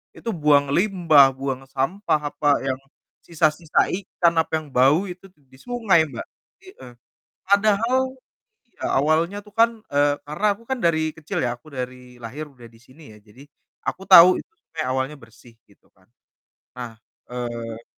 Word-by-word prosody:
itu 230 - -6
buang 145 -5 +2
limbah, 160 -7 +4
buang 135 0 -5
sampah 150 +6 -1
apa 145 -1 +2
yang 130 -1 -2 0.5
sisa-sisa 160 -1 +1
ikan, 175 -2 0
apa 160 - -1
yang 155 -1 -4
bau 135 +9 +4
itu 185 +2 -12
tuh 165 -6 -30
di 130 0 -20
sungai, 215 -10 +1
Mbak, - - -8 0.4
i - - -18
eh. 125 -1 -12 0.6
Padahal 215 +4 +3 0.7
iya, 235 - -12
awalnya 160 +7 +1
tuh 210 - -18
kan 230 +1 +4 0.2
eee, 145 0 +3
karena 155 +9 -2
aku 230 - -20
kan 265 - -1
dari 160 -3 +1
kecil 160 - -5
ya, 120 - 0
aku 140 +6 -20
dari 125 -2 -8
lahir 145 +7 -7
udah 125 -4 -17
di 115 0 -16
sini 130 +6 -19
ya, 105 - -16
jadi 110 +7 -17 0.4
aku 190 - -3
tahu 185 0 +8
itu - - -16
tuh - - -52
kayak 155 -5 -2
awalnya 130 +3 -2
bersih, 115 +1 -18
gitu 100 - -27
kan. 95 - -28 0.7
Nah, 120 -2 -7 0.4
eee 115 -2 -6
150 Hz, 165 wpm, -22 LUFS, 130-175 Hz, 0.7 s, tahu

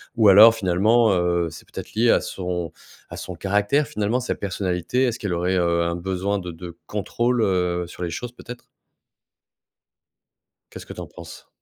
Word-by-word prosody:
Ou 110 -3 +5
alors 110 +4 +9
finalement, 110 +3 +3
heu, 85 -1 +1
c'est 75 - -13
peut-être - - -9
lié 115 +2 +4
à - - +3
son 90 -3 -4 0.4
à - - -8
son 90 - -6
caractère, 105 - +1
finalement, 105 +4 -1
sa 125 - -3
personnalité, 95 +4 -2
est-ce 120 -1 0
qu'elle 105 -4 -3
aurait, 90 +2 0
heu, 85 -1 +1
un 85 0 -1
besoin 95 +3 -2
de 90 -2 -6
de 85 0 -10
contrôle, 120 +4 -1
heu, 90 -3 0
sur 90 - -12
les 85 - -2
choses 120 +9 -5
peut-être? 125 0 -11 2.1
Qu'est-ce - - -10
que - - -9
t'en - - -8
penses? - - -12
95 Hz, 170 wpm, -23 LUFS, 90-115 Hz, 2.1 s, alors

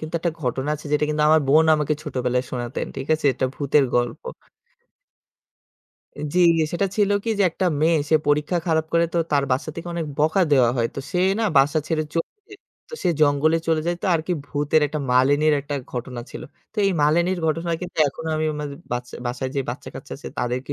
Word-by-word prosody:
কিন্তু 155 +1 -7
একটা 170 - 0
ঘটনা 130 +3 -1
আছে 150 - -9
যেটা 150 0 +3
কিন্তু 150 0 0
আমার 155 0 +5
বোন 155 +3 +6
আমাকে 150 0 0
ছোটবেলায় 125 -4 -1
শোনাতেন। 120 -1 -4
ঠিক 135 0 -5
আছে? 155 -2 -2
এটা 130 +1 -1
ভূতের 140 0 +2
গল্প। 120 0 -1 2.1
জ্বি 180 - +2 0.3
সেটা 175 +3 +1
ছিল 205 -2 +2
কি 230 - -1
যে - - +4
একটা 185 +3 -1
মেয়ে 160 +1 +3
সে 160 - +6
পরীক্ষা 150 +4 +1
খারাপ 160 -1 +1
করে 170 0 +4
তো - - +2
তার 140 -1 +3
বাসা 135 +5 -1
থেকে 165 +1 -6
অনেক 165 -2 -2
বকা 160 +5 +3
দেওয়া 125 -4 +5
হয়। 115 -1 +1
তো - - -4
সে 180 - -1 0.2
না 225 - +1
বাসা 140 +3 +3
ছেড়ে 160 -2 0
চলে 165 - -1 0.2
যায়। 405 -1 -13 0.3
তো - - -6
সে - - +2
জঙ্গলে 150 +2 +3
চলে 160 -1 +2
যায় 175 0 0
তো - - -1
আরকি 160 +2 -1
ভূতের 145 +2 +1
একটা 150 +1 -4
মালিনীর 145 +4 +4
একটা 145 +1 -5 0.2
ঘটনা 125 0 -5
ছিল। - - -8 0.3
তো - - -30
এই 195 - +2
মালিনীর 170 +5 +2
ঘটনা 165 +2 -1
কিন্তু 180 0 -8
এখনো 160 +4 -7
আমি 155 0 0
মাঝ 145 -1 -4 0.2
বাচ 120 0 -3 0.2
বাসায় 125 +2 -3
যে - - +2
বাচ্চা - - -8
কাচ্চা - - -9
আছে - - -8
তাদেরকে 125 +3 -2
150 Hz, 205 wpm, -23 LUFS, 135-165 Hz, 2.1 s, বোন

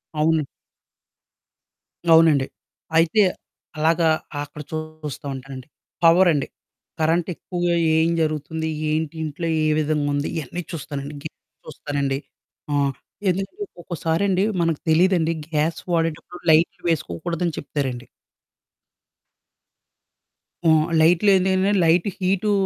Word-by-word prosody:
అవును. 155 +1 +2 1.7
అవునండి. 160 -4 +5 0.5
అయితే 170 +6 +4 0.6
అలాగా 160 +1 +3 0.3
అక్కడ 145 +1 -9
చూస్తూ 155 -2 -6
ఉంటానండి. 130 0 -9 0.4
పవరండి. 165 -4 +5 0.5
కరెంట్ 165 +2 +2
ఎక్కువగా 175 -1 -1 0.2
ఏం 160 +1 +3
జరుగుతుంది, 160 +1 -2 0.2
ఏంటి 155 0 -1
ఇంట్లో 155 +2 -4 0.2
ఏ - - +3
విధంగా 150 -1 0
ఉంది 145 +1 -1
ఇయన్నీ 160 +3 -4
చూస్తానండి. 145 -3 -6
గీజర్ 155 - -8 0.3
చూస్తానండి. 140 -3 -2 0.5
ఆహ్, 140 -1 +2 0.4
ఎందుకంటే 195 - -3 0.2
ఒక్కోసారండి 180 +3 0 0.2
మనకు 165 -3 0
తెలీదండి 165 0 +3 0.2
గ్యాస్ 155 +1 0
వాడేటప్పుడు 165 +1 -2
లైట్లు 160 +2 +3
వేసుకోకూడదని 165 - -2
చెప్తారండి. 130 -4 -4 2.6
ఆ! - - +7 0.3
లైట్లేంటంటే 190 +3 +4
లైట్ 170 +3 +3
హీటు 195 +2 +1
160 Hz, 95 wpm, -22 LUFS, 150-175 Hz, 2.6 s, ఆ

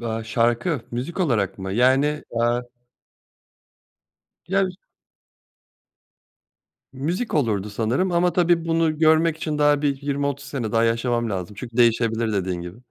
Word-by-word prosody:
Be 115 -1 -3
Şarkı? 120 +6 0
Müzik 130 +11 -4
olarak 105 - 0
mı? 95 0 -5
Yani, 130 +5 +4 0.2
eee 120 +1 +1 1.9
Ya, 195 +1 +2
üz 185 -1 -4 2.2
Müzik 170 - -3
olurdu 105 -9 0
sanırım 115 - 0
ama 175 +1 +2
tabii 175 -2 +2
bunu 165 -2 +1
görmek 160 0 +4
için 155 -2 -3
daha 145 -1 +3
bir 140 -2 -1
20-30 140 0 -2
sene 120 -7 -4
daha 115 0 +2
yaşamam 115 0 0
lazım. 95 0 -4
Çünkü 120 -1 -8
değişebilir 115 -1 +2
dediğin 90 -3 -2
gibi. 90 +4 -9
125 Hz, 130 wpm, -23 LUFS, 115-155 Hz, 2.2 s, Yani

